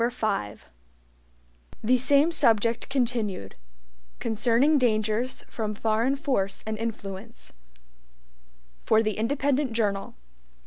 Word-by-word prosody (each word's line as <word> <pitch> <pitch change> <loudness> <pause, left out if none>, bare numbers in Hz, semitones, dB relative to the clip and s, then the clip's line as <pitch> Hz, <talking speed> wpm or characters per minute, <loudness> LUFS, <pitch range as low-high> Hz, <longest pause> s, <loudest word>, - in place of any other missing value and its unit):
5 215 - -3 1.2
The 250 +4 +4
Same 280 +6 +4
Subject 230 -6 +2
Continued 230 - -1 0.6
(Concerning 235 +6 +2
Dangers 220 +1 0
From 215 -2 -4
Foreign 225 +5 +1
Force 255 -9 -1
and 220 0 -2
Influence) 215 -1 -6 1.3
For 220 0 +3
the 215 -2 -1
Independent 275 +2 0
Journal. 205 -3 -1
230 Hz, 90 wpm, -26 LUFS, 215-255 Hz, 1.3 s, The